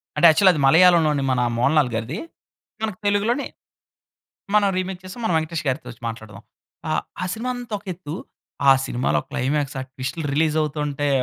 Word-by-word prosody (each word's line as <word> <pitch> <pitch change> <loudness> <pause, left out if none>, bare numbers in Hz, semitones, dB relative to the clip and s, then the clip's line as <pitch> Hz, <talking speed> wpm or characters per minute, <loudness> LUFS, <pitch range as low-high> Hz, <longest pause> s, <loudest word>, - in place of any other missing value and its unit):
అంటే 150 - +4
యాక్చువలి 185 +4 +6
అది 150 - -2
మలయాళం 170 +4 +6
లోని, 145 -2 0
మన 125 -1 +1 0.2
మోహన్ 125 +6 +2
లాల్ 145 -4 +4
గారిది. 115 +7 -3 0.7
మనకి 215 -4 -3
తెలుగులోని, 215 +7 +1 1.1
మనం 205 -1 +5
రీమేక్ 185 0 -3
చేసి, 185 +3 -9
మనం 200 - +1
వెంకటేష్ 160 0 -3
గారితో 130 +1 -2
వచ్చి 115 - -14
మాట్లాడుదాం. 110 -3 -9 0.8
ఆహ్, 180 - -1
సినిమా 240 +3 -3
అంతా 245 -3 -6
ఒక - - -24
ఎత్తు. 165 -3 -7 0.6
ఆ - - +10
సినిమాలో 125 +2 0
క్లైమాక్స్, 145 0 -1
ఆ - - -3
ట్విస్ట్‌లు 130 +5 -5
రిలీజవుతుంటే, 150 -1 0
155 Hz, 160 wpm, -22 LUFS, 135-185 Hz, 1.1 s, ఆ